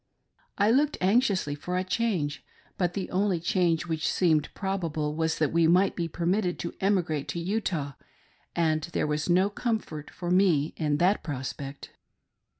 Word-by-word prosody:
I 205 +2 +4
looked 290 +4 +2
anxiously 195 - +2
for 180 +5 -3
a 185 - 0
change, 180 -7 -1 0.3
but 180 -3 -1
the 195 -2 -3
only 190 -1 +1
change 170 -1 +1
which 160 -2 -2
seemed 160 -5 +2
probable 165 -6 -2
was 160 +1 0
that 155 -1 0
we 165 -1 +4
might 185 +4 +4
be 170 -2 -1
permitted 175 +3 0
to 170 - -5
emigrate 175 -7 +1
to 170 - -3
Utah, 170 -6 -2 0.6
and 160 -2 +2
there - - +1
was 150 +2 -1
no 185 +3 +4
comfort 205 -10 -3
for 175 0 -5
me 175 -6 +3
in 150 -2 0
that 185 +6 +3
prospect. 140 -1 -6
175 Hz, 155 wpm, -27 LUFS, 155-190 Hz, 0.6 s, I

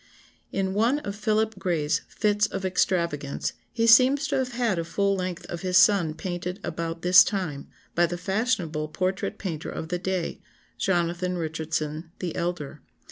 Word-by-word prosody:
*] - - -38
"In 190 0 -1
one 230 +7 +2
of 200 -9 -5
Philip 215 0 0
Gray's 165 -5 0
fits 210 -1 +1
of 195 -1 -4
extravagance 170 -6 0 0.2
he 230 -1 0
seems 260 +5 +6
to - - +1
have 255 -1 -2
had 235 -7 0
a - - -1
full 200 +4 0
length 185 -2 -4
of 175 - -6
his 185 -1 +2
son 185 -7 +5
painted 180 +1 -4
about 165 0 -4
this 180 +1 +8
time, 170 -9 -3 0.3
by 175 0 +3
the 175 +1 -4
fashionable 180 -6 -1
portrait 185 +6 -2
painter 165 -6 -4
of 160 - -6
the 180 0 -1
day, 185 -2 -2 0.4
Jonathan 175 0 0
Richardson 160 -1 -3
the 175 -3 -4
elder. 170 -5 -3
180 Hz, 165 wpm, -26 LUFS, 165-200 Hz, 0.4 s, this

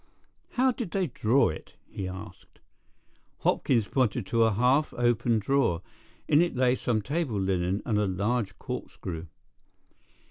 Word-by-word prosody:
"How 260 +1 +3
did 235 -5 -5
they 190 +1 0
draw 125 -2 +2
it?" 80 - -8
he 95 - -5
asked. 95 0 -10 0.8
Hopkins 115 -6 +2
pointed 125 -5 0
to 115 +3 +3
a 110 - +3
half 125 +8 +2
opened 120 -2 +1
drawer. 115 -10 +1 0.4
In 150 - +5
it 175 -4 0
lay 125 0 +3
some 115 -4 -1
table 140 -5 -1
linen 95 0 0
and 105 -3 +1
a 105 - +1
large 100 +2 -1
corkscrew. 85 -1 -6
115 Hz, 140 wpm, -28 LUFS, 95-135 Hz, 0.8 s, In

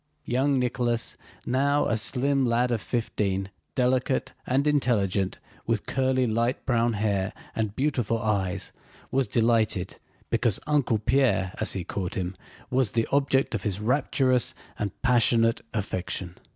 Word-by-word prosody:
Young 135 +3 +1
Nicholas, 120 -2 0 0.3
now 140 +3 +2
a 115 - +1
slim 135 +5 +2
lad 120 0 +2
of 115 -3 0
fifteen, 100 -5 -2 0.2
delicate 130 +1 +1
and 135 +3 +2
intelligent, 105 -10 +1 0.3
with - - 0
curly 130 -1 +1
light 115 +3 0
brown 120 -2 +2
hair 100 -2 0 0.2
and 110 -2 -2
beautiful 130 -6 0
eyes, 100 -4 -1 0.4
was 135 -2 +1
delighted 110 -4 +1 0.3
because - - +2
Uncle 145 -7 +2
Pierre 110 -5 +2
as - - +2
he 95 - -3
called 90 +1 -4
him 90 0 -3 0.4
was 125 -4 +1
the 115 -1 +1
object 135 -2 +2
of 110 - -1
his 100 -1 -2
rapturous 130 +1 +1 0.2
and 100 -2 -3
passionate 115 -2 +3
affection. 95 -3 -3
115 Hz, 135 wpm, -26 LUFS, 105-130 Hz, 0.4 s, passionate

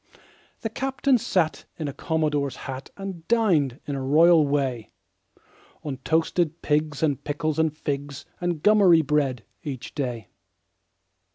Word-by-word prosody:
The 225 - -2
captain 270 0 +1
sat 180 -8 0
in 155 - -3
a 140 - -4
commodore's 150 -4 -1
hat 135 0 -6
And 190 -4 -7
dined, 170 - +2
in 145 - -4
a 135 - -3
royal 155 +3 +5
way, 135 -5 -1 0.9
On 140 -3 -4
toasted 160 +3 0
pigs 150 0 0
and 145 -4 0
pickles 155 +1 -2
and 160 -1 +3
figs 145 -1 -4
And 175 -3 -2
gummery 195 -6 +6
bread, 135 -5 0 0.2
each 140 -7 -6
day. 125 -6 -4
150 Hz, 130 wpm, -25 LUFS, 140-170 Hz, 0.9 s, gummery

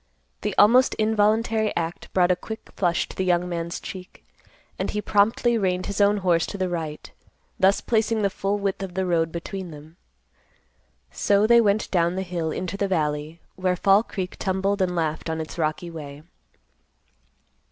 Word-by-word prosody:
The - - -2
almost 245 +5 +5
involuntary 220 0 +2
act 165 0 -4
brought 180 -1 +3
a - - +3
quick 220 +4 -9
flush 175 -3 +1
to - - -11
the 190 - -1
young 180 -1 +1
man's 170 -1 -4
cheek, 185 -4 -10 0.5
and - - -1
he 210 - -2
promptly 225 +3 +2
reined 185 -2 0
his 200 0 -2
own 205 +1 +4
horse 170 -2 +3
to - - -6
the 185 -1 -1
right, 160 -3 -5 0.5
thus 190 +1 +4
placing 220 -1 +1
the 200 - +2
full 200 +1 -1
width 200 -1 -2
of 185 -2 -6
the 190 0 0
road 165 -2 +1
between 185 +2 -6
them. 155 +2 -13 1.1
So 200 +1 +2
they 235 +1 +6
went 210 -1 +1
down 175 -1 +2
the 190 - -2
hill 175 -3 -3
into 185 +4 -4
the 200 - 0
valley, 155 -2 -2
where 185 -1 0
Fall 195 +3 +4
Creek 190 -5 -6
tumbled 195 +1 0
and 180 -1 0
laughed 160 -1 -2
on 160 0 -2
its 160 +2 -6
rocky 160 +2 -2
way. 150 -2 -9
185 Hz, 175 wpm, -24 LUFS, 170-205 Hz, 1.1 s, they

